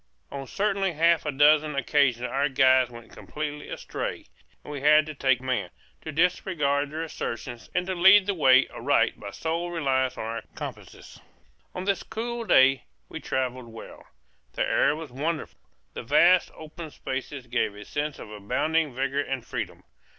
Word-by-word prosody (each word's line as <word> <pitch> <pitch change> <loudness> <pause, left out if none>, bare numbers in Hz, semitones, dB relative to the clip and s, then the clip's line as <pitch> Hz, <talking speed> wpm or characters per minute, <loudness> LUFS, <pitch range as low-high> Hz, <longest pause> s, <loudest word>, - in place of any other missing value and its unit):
On 135 -1 -6
certainly 195 0 0
half 165 0 +2
a - - 0
dozen 150 +1 +4
occasions 130 -3 +1
our 140 +3 0
guides 130 -2 +4
went 115 -1 -13
completely 150 -1 -6
astray, - - -5 0.4
and 150 - -8
we 140 - -5
had 150 +1 +5
to 155 - -7
take 130 -3 +2
command, 130 0 -2 0.3
to 155 - -6
disregard 150 -4 +1
their 155 +2 -4
assertions, 120 -6 -6
and 180 0 +1
to 190 - -2
lead 190 +3 +7
the 200 - 0
way 135 -6 +5
aright - - +1
by - - -7
sole 165 +2 -3
reliance 135 -6 0
on - - -4
our 115 +1 -4
compasses. - - -9 0.5
On 185 - -4
this 195 0 0
cool 235 +1 -5
day 135 -7 +4 0.2
we - - -6
travelled 130 -1 -3
well. 115 -1 -12 0.5
The - - -1
air 145 - +2
was 155 -4 -8
wonderful; 155 +5 -4 0.3
the - - -6
vast 170 +8 +4
open 160 +1 -9
spaces 135 -1 -6
gave 120 -4 -1
a 105 0 -10
sense 150 0 -3
of 105 - -10
abounding 150 +8 -1
vigor 135 +2 0
and 135 -3 -4
freedom. - - -5
145 Hz, 165 wpm, -26 LUFS, 130-165 Hz, 0.5 s, lead